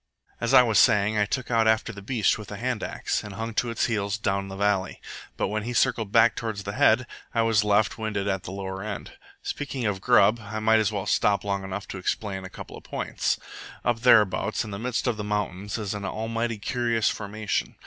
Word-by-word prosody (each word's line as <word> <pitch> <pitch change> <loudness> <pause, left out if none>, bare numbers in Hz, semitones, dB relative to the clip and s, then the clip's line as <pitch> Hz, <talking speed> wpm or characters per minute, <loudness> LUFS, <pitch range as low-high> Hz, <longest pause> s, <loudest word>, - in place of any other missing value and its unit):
"As 115 - -1
I 125 - +9
was 110 -5 +3
saying, 105 +1 +4
I 105 - +2
took 130 +2 -3
out 115 -1 +3
after 110 +1 +2
the 100 - -9
beast 110 0 +1
with 105 - -8
the 105 - -7
hand 125 0 -2
axe, - - -2
and 105 -2 -8
hung 115 +2 -4
to 120 +2 0
its 115 - 0
heels 100 -3 -1
down 100 -2 -1
the 95 - -7
valley; 100 -1 0 0.4
but - - 0
when 110 +1 -1
he 120 +3 -4
circled 110 -3 +1
back 115 0 +5
toward 110 -3 -4
the 100 0 -5
head, 115 +4 +4 0.3
I 115 - +3
was 115 -2 +3
left 105 +2 +2
winded 105 -2 -2
at 95 -2 0
the 90 - -8
lower 95 0 -5
end. 105 -1 -6 0.3
Speaking 140 -4 -4
of 100 -3 -1
grub, 105 +5 +5
I 110 +1 -6
might 110 +1 +4
as 110 -1 +1
well 100 -2 -3
stop 105 -1 +2
long 100 -1 -2
enough 95 +1 -5
to 95 - -5
explain 95 +1 -2
a 95 - -7
couple - - -10
of - - -12
points. - - -2 0.5
Up 120 -1 +1
thereabouts, 110 -3 +4
in 110 - -8
the 100 - -5
midst 125 +1 -2
of 120 -4 0
the 105 - -4
mountains, 105 -1 -2
is 105 -3 -3
an 105 -1 -5
almighty 115 +3 -2
curious 115 +1 0
formation. 105 +1 -2
105 Hz, 225 wpm, -26 LUFS, 100-115 Hz, 0.5 s, I